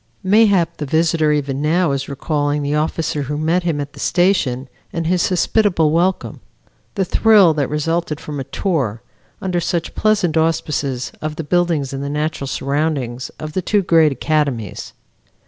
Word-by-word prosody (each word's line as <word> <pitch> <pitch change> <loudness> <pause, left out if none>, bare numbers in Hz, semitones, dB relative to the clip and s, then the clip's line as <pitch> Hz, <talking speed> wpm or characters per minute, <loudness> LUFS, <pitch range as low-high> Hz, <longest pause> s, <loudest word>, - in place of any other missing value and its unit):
Mayhap 195 -4 +3
the 150 - -4
visitor 160 0 +2
even 140 -2 -1
now 165 +1 +2
is 140 0 -3
recalling 145 +1 -1
the 145 +1 -1
officer 155 0 -1
who 145 +2 -3
met 160 +4 +1
him 165 -4 -1
at 145 0 -5
the - - -13
station, 170 -9 +1 0.2
and 165 0 -3
his 180 +3 +1
hospitable 180 -3 +2
welcome; 175 +4 0 0.6
the 195 - 0
thrill 205 -3 +5
that 145 -3 -1
resulted 155 +1 -1
from 150 -2 -6
a - - -2
tour, 130 - -2 0.4
under 180 -2 0
such 170 0 -2
pleasant 205 -7 +1
auspices, 150 -5 -1
of 155 0 -3
the 165 - -4
buildings 165 -4 0
and 135 - -4
the 140 - -3
natural 150 -1 -2
surroundings 135 -3 -2
of 155 0 -7
the 185 - -1
two 205 +3 +1
great 165 -3 +4
academies. 135 - -2
155 Hz, 165 wpm, -19 LUFS, 145-175 Hz, 0.6 s, thrill